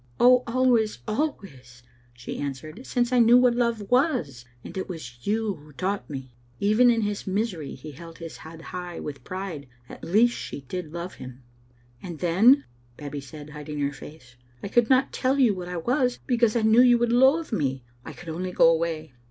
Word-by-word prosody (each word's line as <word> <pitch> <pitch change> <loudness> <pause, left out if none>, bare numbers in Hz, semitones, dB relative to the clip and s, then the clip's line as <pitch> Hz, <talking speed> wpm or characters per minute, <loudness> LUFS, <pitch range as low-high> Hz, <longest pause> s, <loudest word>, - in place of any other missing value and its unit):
"Oh, 250 +1 +6
always, 235 -3 +2
always," 140 - -4 0.3
she 120 0 -8
answered, 155 - -6
"since 245 -1 0
I 250 - +4
knew 235 +1 +7
what 250 -1 +4
love 235 -4 -1
was; 250 - +1 0.2
and - - -10
it 190 - -4
was 125 -9 -9
you 215 0 0
who 150 -3 -15
taught 190 +8 -3
me. 135 -3 -7 0.2
" 120 0 -33
Even 245 +4 +5
in 230 -1 +2
his 205 -1 -3
misery 190 -7 -2
he 155 - -10
held 165 +3 -12
his 165 -1 -8
head 160 +1 -11
high 180 -1 -5
with 145 -2 -7
pride. 185 -7 -6 0.2
At - - -12
least 225 +7 +3
she - - -6
did 155 +4 -6
love 170 +2 -6
him. 130 0 -11 0.6
"And 175 -4 -7
then," 210 - +4 0.3
Babbie 145 -1 -6
said, 145 +2 -11
hiding 150 0 -7
her 140 0 -1
face, 135 -4 -13 0.3
"I - - -4
could 240 +1 +3
not 265 0 +3
tell 265 +1 +1
you 250 -6 +4
what 180 -2 -6
I 180 - -4
was 250 - 0
because 235 -3 +2
I 230 - +1
knew 220 +2 +6
you 245 -1 +6
would 235 0 +1
loathe 270 +6 +4
me. 135 - -1 0.2
I - - -8
could 170 - -10
only 180 +3 -4
go 165 - +5
away. 160 -3 -2
185 Hz, 195 wpm, -25 LUFS, 150-240 Hz, 0.6 s, knew